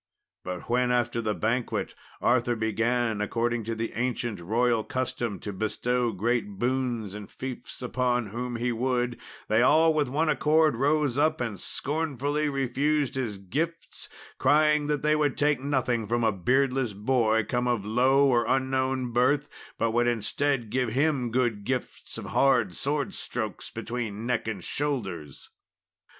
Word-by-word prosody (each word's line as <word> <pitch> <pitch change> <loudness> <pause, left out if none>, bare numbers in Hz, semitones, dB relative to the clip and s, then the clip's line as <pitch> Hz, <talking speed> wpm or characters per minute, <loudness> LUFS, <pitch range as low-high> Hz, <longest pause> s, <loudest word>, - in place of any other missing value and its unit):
But 90 0 -6
when 125 +1 +2
after 120 -1 +1
the 110 -2 -1
banquet 115 +2 -1 0.3
Arthur 120 -1 +2
began, 115 0 0
according 115 +2 -1
to 115 0 -2
the 115 +1 -3
ancient 120 -3 -2
royal 115 +5 +1
custom, 120 -5 -3
to 105 - -5
bestow 120 +4 0
great 105 0 -1
boons 120 -3 -1
and 105 -1 -8
fiefs 130 -2 -7
on 125 -2 0
whom 120 +3 -4
he 120 +1 -1
would, 120 0 -1 0.3
they 110 +2 +3
all 160 +5 +5
with 150 -4 +1
one 155 +5 +1
accord 155 -1 +3
rose 145 +1 +1
up, 155 +1 +2
and 115 -6 -3
scornfully 150 - -1
refused 140 +1 0
his 120 -6 -3
gifts, 155 - -4 0.3
crying 150 +2 +4
that 150 -2 -1
they 150 0 +3
would 150 -3 +1
take 145 -1 +2
nothing 130 -5 0
from 120 +2 0
a 110 - +4
beardless 125 +4 +1
boy 110 0 +2
come 125 0 0
of 120 -5 0
low 130 +6 +4
or 120 -3 +2
unknown 130 -1 0
birth, 140 +4 +2 0.3
but 115 - +1
would 120 +1 +2
instead 120 +1 0
give 130 -2 +1
him 135 -2 +1
good 115 -4 0
gifts 130 +3 -4
of - - -6
hard 125 -9 +2
sword 140 - -2
strokes - - -4
between 115 -2 -4
neck 125 -2 -1
and 100 -5 -4
shoulders. 95 - -4
125 Hz, 150 wpm, -27 LUFS, 115-135 Hz, 0.3 s, all